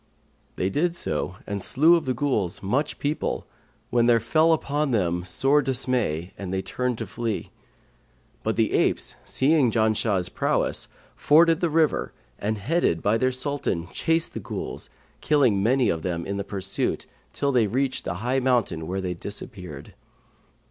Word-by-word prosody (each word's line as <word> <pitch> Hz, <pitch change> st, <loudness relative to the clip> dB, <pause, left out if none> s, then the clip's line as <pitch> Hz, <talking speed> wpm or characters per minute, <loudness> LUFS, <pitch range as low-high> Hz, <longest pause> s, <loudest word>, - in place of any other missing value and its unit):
They 95 Hz, +1 st, -1 dB
did 170 Hz, -, 0 dB
so 90 Hz, -, -2 dB
and 100 Hz, -1 st, -3 dB
slew 155 Hz, -, +5 dB
of 170 Hz, -, -1 dB
the 130 Hz, -1 st, -1 dB
Ghuls 110 Hz, -11 st, -1 dB
much 135 Hz, +10 st, 0 dB
people, 145 Hz, +2 st, -2 dB, 0.5 s
when 120 Hz, -1 st, +3 dB
there 120 Hz, -1 st, +5 dB
fell 155 Hz, +9 st, +3 dB
upon 150 Hz, -1 st, 0 dB
them 90 Hz, -7 st, 0 dB
sore 135 Hz, +10 st, +2 dB
dismay 125 Hz, -, -1 dB
and 95 Hz, -2 st, -5 dB
they 95 Hz, 0 st, -1 dB
turned 125 Hz, -2 st, -2 dB
to 115 Hz, -, -4 dB
flee; 110 Hz, +1 st, -4 dB, 0.9 s
but -, -, -1 dB
the -, -, +1 dB
apes, -, -, +1 dB
seeing 140 Hz, -1 st, +3 dB
Janshah's 110 Hz, -4 st, +1 dB
prowess, -, -, 0 dB, 0.3 s
forded 165 Hz, +2 st, +5 dB
the 175 Hz, -, +1 dB
river 160 Hz, 0 st, +1 dB, 0.3 s
and 110 Hz, +1 st, -1 dB
headed 110 Hz, -, 0 dB
by 105 Hz, +3 st, +2 dB
their 130 Hz, +2 st, +2 dB
Sultan 130 Hz, -, -2 dB
chased 165 Hz, 0 st, 0 dB
the -, -, -4 dB
Ghuls, -, -, -6 dB, 0.3 s
killing 130 Hz, -10 st, +3 dB
many 125 Hz, +5 st, +3 dB
of 80 Hz, -, -1 dB
them 85 Hz, -1 st, -3 dB
in 100 Hz, 0 st, -3 dB
the 100 Hz, -, -2 dB
pursuit, 100 Hz, -1 st, -2 dB, 0.3 s
till 140 Hz, -, 0 dB
they 120 Hz, -5 st, +3 dB
reached 135 Hz, +3 st, -1 dB
the -, -, -3 dB
high 130 Hz, +2 st, +2 dB
mountain 120 Hz, -11 st, 0 dB
where 95 Hz, +2 st, -2 dB
they 90 Hz, -1 st, -2 dB
disappeared. 90 Hz, -, -8 dB
120 Hz, 160 wpm, -25 LUFS, 95-140 Hz, 0.9 s, slew